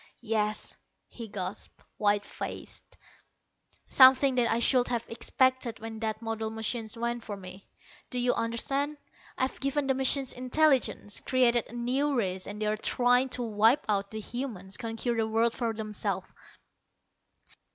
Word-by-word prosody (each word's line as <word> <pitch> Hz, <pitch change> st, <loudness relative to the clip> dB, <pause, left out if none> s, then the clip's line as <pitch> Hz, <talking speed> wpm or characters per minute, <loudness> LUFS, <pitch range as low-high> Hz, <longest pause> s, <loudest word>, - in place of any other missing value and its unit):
"Yes," 215 Hz, -2 st, -1 dB, 0.3 s
he 230 Hz, -2 st, -8 dB
gasped, 200 Hz, 0 st, -5 dB, 0.2 s
white 205 Hz, -1 st, +2 dB
faced, -, -, -7 dB, 0.9 s
"something 265 Hz, +1 st, +7 dB
that 245 Hz, -2 st, +2 dB
I 225 Hz, -, +2 dB
should 245 Hz, +1 st, +4 dB
have 235 Hz, -2 st, -2 dB
expected 260 Hz, 0 st, 0 dB
when 225 Hz, 0 st, -7 dB
that 220 Hz, 0 st, -3 dB
model 225 Hz, -1 st, -3 dB
machine 220 Hz, +1 st, -3 dB
went 235 Hz, +1 st, -2 dB
for 205 Hz, -3 st, -6 dB
me. 190 Hz, 0 st, -11 dB, 0.4 s
Do 250 Hz, -, -3 dB
you 245 Hz, 0 st, +2 dB
understand? 275 Hz, +6 st, -1 dB, 0.4 s
I've 260 Hz, +1 st, -1 dB
given 275 Hz, +1 st, 0 dB
the 265 Hz, -, +2 dB
machines 265 Hz, 0 st, +2 dB
intelligence, 255 Hz, -4 st, +1 dB
created 245 Hz, -2 st, +2 dB
a -, -, -12 dB
new 260 Hz, +4 st, 0 dB
race, 190 Hz, -5 st, -1 dB
and 205 Hz, +1 st, -7 dB
they 215 Hz, -, -1 dB
are 210 Hz, 0 st, 0 dB
trying 245 Hz, +3 st, +2 dB
to 245 Hz, -, -2 dB
wipe 225 Hz, +4 st, +3 dB
out 200 Hz, -2 st, 0 dB
the 220 Hz, -, -5 dB
humans; 215 Hz, -5 st, -5 dB
conquer 230 Hz, 0 st, -2 dB
the 225 Hz, -1 st, 0 dB
world 225 Hz, +1 st, +2 dB
for 235 Hz, -2 st, -1 dB
themselves. 210 Hz, -3 st, -3 dB
230 Hz, 150 wpm, -29 LUFS, 215-255 Hz, 0.9 s, something